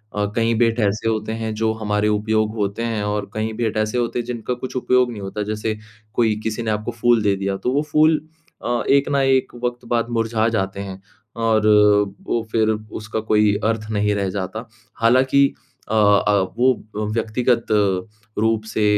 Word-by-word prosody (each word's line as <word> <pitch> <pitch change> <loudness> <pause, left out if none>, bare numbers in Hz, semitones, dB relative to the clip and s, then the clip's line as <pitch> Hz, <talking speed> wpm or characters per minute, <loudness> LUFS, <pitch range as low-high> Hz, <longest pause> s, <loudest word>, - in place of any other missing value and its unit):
अ, 105 0 +1
कई 115 -1 +2
भेंट 115 +1 +2
ऐसे 110 +1 +1
होते 110 -1 -2
हैं 110 -1 -2
जो 110 +1 +1
हमारे 105 -1 -1
उपयोग 110 +1 0
होते 105 +1 -2
हैं 115 -3 -1
और 105 -1 -2
कईं 110 0 -2
भेंट 115 -2 -1
ऐसे 110 +2 0
होते 120 0 -1
हैं 120 - -3
जिनका 120 0 -3
कुछ 125 +1 -7
उपयोग 125 -1 +2
नहीं 105 -3 -7
होता, 100 +2 -4
जैसे 110 +1 -3 0.4
कोई 110 -3 +2
किसी 110 +1 -2
ने 110 - -1
आपको 105 +2 -2
फूल 120 -2 +4
दे 100 -1 +2
दिया, 95 0 -2
तो 110 +6 -2
वो 145 - +2
फूल 155 +1 +5 0.5
अ, 120 0 0
एक 140 0 +4
ना 140 -1 +2
एक 135 -2 +1
वक़्त 120 0 -3
बाद 120 0 0
मुरझा 115 -1 0
जाते 95 -3 -2
हैं, 95 -1 -7 0.3
और 110 -2 +2 0.6
वो 120 - 0
फिर 110 -1 +2
उसका 110 0 -4
कोई 105 -1 +2
अर्थ 110 -1 -1
नहीं 105 -1 +1
रह 100 -2 -1
जाता। 100 +5 -5 0.3
हालाँकि 130 +4 +4 0.4
अ - - -2
अ, 105 -1 +4 0.2
वो 130 +2 +4 0.2
अ, - - -2
व्यक्तिगत 115 +1 0 0.7
रूप 110 0 +1
से 110 -1 -2
110 Hz, 185 wpm, -21 LUFS, 105-120 Hz, 0.7 s, फूल